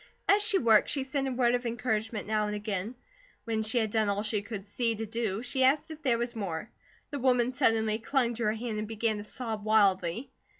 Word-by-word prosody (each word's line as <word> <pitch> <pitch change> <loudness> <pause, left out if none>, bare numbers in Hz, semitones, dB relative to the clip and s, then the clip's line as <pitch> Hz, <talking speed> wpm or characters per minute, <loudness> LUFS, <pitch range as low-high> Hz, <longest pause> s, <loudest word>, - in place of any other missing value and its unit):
As 405 +1 +5
she 415 -1 +2
worked, 225 - +4
she 275 - 0
said 270 +1 -2
a - - -1
word 245 -1 +2
of 245 0 0
encouragement 220 -2 -2
now 215 0 0
and 210 - -3
again; 210 +2 -3 0.5
when 225 -1 -1
she 220 +3 0
had 220 -3 +1
done 220 -2 +2
all 200 +1 0
she 215 -1 0
could 205 -1 -7
see 230 +2 -1
to 225 +1 -4
do, 225 -1 -2
she 260 +1 0
asked 280 +4 +3
if 310 0 -9
there 255 -5 +2
was 240 +1 -3
more. 200 -1 -4 0.4
The 285 - -3
woman 250 -1 +3
suddenly 225 -4 +2
clung 240 0 +1
to 235 0 -3
her 210 - +2
hand 220 -1 -4
and 215 - -3
began 220 0 0
to 205 - -6
sob 220 -1 -5
wildly. 210 +2 +2
225 Hz, 225 wpm, -29 LUFS, 210-245 Hz, 0.5 s, As